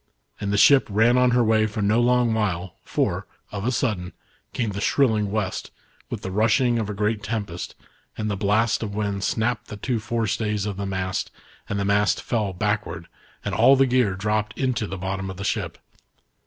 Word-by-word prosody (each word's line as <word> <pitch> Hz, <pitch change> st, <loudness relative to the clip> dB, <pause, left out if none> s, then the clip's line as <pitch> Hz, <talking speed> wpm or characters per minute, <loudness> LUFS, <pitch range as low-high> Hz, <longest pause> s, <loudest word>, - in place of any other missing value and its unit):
And 100 Hz, -, -2 dB
the 100 Hz, -, +1 dB
ship 140 Hz, +5 st, +6 dB
ran 115 Hz, +4 st, +4 dB
on 125 Hz, 0 st, +4 dB
her 125 Hz, 0 st, +3 dB
way 110 Hz, -1 st, +3 dB
for 105 Hz, 0 st, -3 dB
no 110 Hz, +4 st, +3 dB
long 120 Hz, -1 st, +3 dB
while, 95 Hz, -5 st, -1 dB
for, -, -, -1 dB, 0.2 s
of 100 Hz, 0 st, -4 dB
a 125 Hz, -, +2 dB
sudden, 105 Hz, -8 st, -1 dB, 0.4 s
came 115 Hz, -4 st, -1 dB
the 100 Hz, +1 st, -4 dB
shrilling 110 Hz, -7 st, +2 dB
West, 100 Hz, -2 st, -2 dB, 0.4 s
with -, -, -5 dB
the 95 Hz, -, -4 dB
rushing 115 Hz, +4 st, +2 dB
of 110 Hz, -2 st, -2 dB
a -, -, -2 dB
great 105 Hz, +1 st, 0 dB
tempest, 100 Hz, -5 st, -4 dB, 0.4 s
and 110 Hz, -, -2 dB
the 105 Hz, -, -1 dB
blast 105 Hz, +3 st, +1 dB
of 105 Hz, -3 st, -4 dB
wind 100 Hz, -2 st, -2 dB
snapped 115 Hz, +5 st, -1 dB
the 105 Hz, -, -7 dB
two 120 Hz, +3 st, -1 dB
forestays 110 Hz, -2 st, -1 dB
of 100 Hz, -2 st, -4 dB
the 100 Hz, 0 st, -3 dB
mast, 95 Hz, -1 st, -2 dB, 0.4 s
and 100 Hz, -, -1 dB
the 100 Hz, -, 0 dB
mast 100 Hz, +1 st, +2 dB
fell 110 Hz, -5 st, -1 dB
back 105 Hz, +2 st, 0 dB
ward, 85 Hz, +1 st, -8 dB, 0.4 s
and -, -, -2 dB
all 135 Hz, -, +6 dB
the 135 Hz, 0 st, +4 dB
gear 125 Hz, -6 st, +2 dB
dropped 105 Hz, +2 st, -1 dB
into 130 Hz, -5 st, 0 dB
the 95 Hz, -, -5 dB
bottom 95 Hz, +1 st, -3 dB
of 95 Hz, -, -7 dB
the 100 Hz, -, -5 dB
ship. 100 Hz, -5 st, -2 dB
105 Hz, 200 wpm, -24 LUFS, 100-115 Hz, 0.4 s, ship